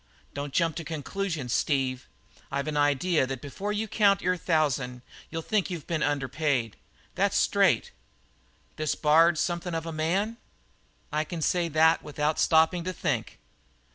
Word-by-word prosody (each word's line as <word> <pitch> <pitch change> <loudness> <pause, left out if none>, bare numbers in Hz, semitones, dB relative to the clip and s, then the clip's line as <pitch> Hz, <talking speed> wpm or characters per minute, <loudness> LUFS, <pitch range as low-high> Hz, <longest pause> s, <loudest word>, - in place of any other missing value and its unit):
"Don't 145 0 -5
jump 165 +1 +1
to 165 - -4
conclusions, 160 -3 -3
Steve. 130 -3 0 0.4
I've 140 +2 -2
an 155 - -2
idea 145 +1 +2
that 135 -1 -4
before 190 +10 -5
you 210 +1 -2
count 200 -2 +3
your 180 0 +2
thousand 140 -8 0 0.3
you'll 165 0 -4
think 210 0 0
that 185 - -5
you've 165 -4 -6
been 165 -3 -2
underpaid. 140 -5 0 0.4
That's - - +1
straight." - - +3 0.9
"This 155 -1 -1
Bard 165 +3 +4
is 155 - -1
something 175 0 -2
of 165 0 -3
a 165 - -4
man?" 185 +9 -1 0.7
"I 155 0 0
can 160 0 -5
say 175 +3 +1
that 160 +1 +4
without 150 +1 -2
stopping 160 +2 +3
to 185 - -2
think." - - -2
160 Hz, 160 wpm, -27 LUFS, 145-175 Hz, 0.9 s, Bard